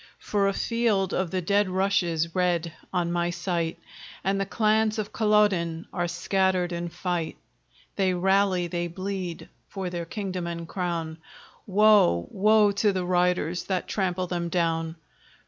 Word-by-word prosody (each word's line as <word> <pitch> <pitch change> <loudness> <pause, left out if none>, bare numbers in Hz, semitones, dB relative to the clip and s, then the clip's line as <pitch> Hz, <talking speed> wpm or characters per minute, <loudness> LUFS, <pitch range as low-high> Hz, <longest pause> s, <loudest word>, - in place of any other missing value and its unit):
For 200 -1 0
a 195 - +1
field 215 -4 0
of 185 -2 0
the 185 +1 -2
dead 200 +2 +2
rushes 175 -4 0
red 175 -3 0 0.2
on 175 -2 0
my 175 0 0
sight, 175 -2 -2 0.5
And 195 +1 +1
the 195 - -2
clans 215 0 +2
of 215 -1 -4
Culloden 205 -7 +2
are 175 -2 -1
scattered 185 0 0
in 170 0 -3
fight. 175 -1 -3 0.6
They 190 -2 +2
rally, 190 0 +2
they 175 0 -2
bleed, 185 -1 -5 0.2
for 190 -3 -4
their 170 -1 -4
kingdom 185 -1 -4
and 170 -1 -5
crown; 170 -3 -3 0.5
Woe, 200 - +4
woe 210 +1 +4
to 200 +1 +2
the 185 -2 -2
riders 180 -1 +1
that 185 -2 -2
trample 185 -2 -1
them 175 -1 -3
down! 165 -2 0
180 Hz, 145 wpm, -26 LUFS, 170-195 Hz, 0.6 s, Woe